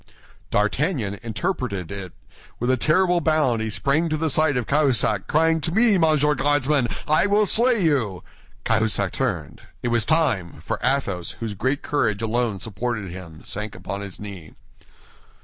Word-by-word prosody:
D'Artagnan 105 - 0
interpreted 115 - -3
it; 100 -3 -6 0.5
with 120 +2 +1
a - - +3
terrible 175 +6 +2
bound 150 -8 +2
he 110 - -2
sprang 140 - +1
to 155 - 0
the 160 0 0
side 155 -1 +3
of 125 - -1
Cahusac, 130 -9 +2
crying, 160 +1 +2
"To 165 - -1
me, 220 0 +4
Monsieur 155 -2 +3
Guardsman; 145 -2 +1 0.2
I 155 +6 +3
will 210 +1 +3
slay 230 +1 +3
you!" 120 - 0 0.4
Cahusac 110 -4 +1
turned. 95 - -3 0.2
It 120 - 0
was 120 -1 +2
time; 115 - +1
for - - -2
Athos, 115 -10 -1
whose 115 -2 -4
great 130 +8 -1
courage 115 -8 0
alone 115 -2 0
supported 110 0 -4
him, 85 -4 -10
sank 105 +1 -4
upon 95 +2 -5
his 100 -3 -8
knee. 100 -6 -9
125 Hz, 155 wpm, -23 LUFS, 100-155 Hz, 0.5 s, me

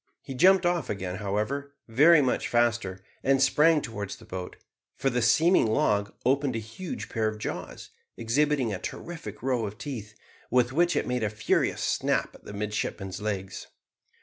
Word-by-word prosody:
He 135 - -7
jumped 185 +6 +5
off 175 -5 0
again, 95 -2 -3
however, 110 +8 -3
very 150 +7 +6
much 125 - 0
faster, 115 -6 0 0.2
and 135 0 +3
sprang 150 +3 +4
towards 105 -4 -5
the - - -16
boat, 90 -1 -6 0.4
for 135 - 0
the 125 0 0
seeming 155 - +4
log 105 -2 +1
opened 135 -1 +2
a - - -1
huge 115 - -7
pair 110 -2 -1
of 110 0 -3
jaws, 105 - -6 0.3
exhibiting 130 0 +1
a 95 - -4
terrific 170 -6 -7
row 125 -4 0
of 105 +1 -8
teeth, 110 -7 -7 0.3
with 125 0 +2
which 175 +3 +2
it - - +1
made 125 -1 -1
a 105 - +1
furious 105 +1 0
snap - - 0
at - - -17
the - - -8
midshipman's 105 -2 -3
legs. 100 -2 -4
120 Hz, 170 wpm, -27 LUFS, 105-140 Hz, 0.4 s, very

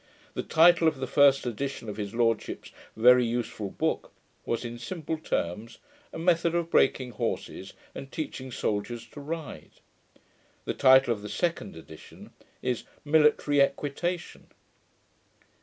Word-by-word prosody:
The - - -2
title 170 +1 +5
of 160 -3 +1
the 130 - -2
first 140 0 +4
edition 125 +1 -4
of 105 -1 -6
his 105 +1 -5
lordship's 115 -2 -1 0.3
very 125 +2 +6
useful 115 -3 -3
book - - -2 0.4
was, 115 +1 -2
in 120 0 -6
simple 160 +5 -4
terms, 110 - -3 0.3
A - - -7
Method 170 0 +2
of 170 -1 -1
Breaking 130 -2 +2
Horses 105 - -4 0.2
and 135 - -9
Teaching 130 -4 -5
Soldiers 115 +2 -3
to 145 - -11
Ride. 160 +2 -7 0.9
The - - -1
title 130 -2 +5
of 105 - -8
the 105 - -7
second 165 - -2
edition 80 -1 -13 0.3
is, 125 -2 -1 0.2
Military 150 -1 +4
Equitation. 155 +5 -2
130 Hz, 135 wpm, -27 LUFS, 115-155 Hz, 0.9 s, very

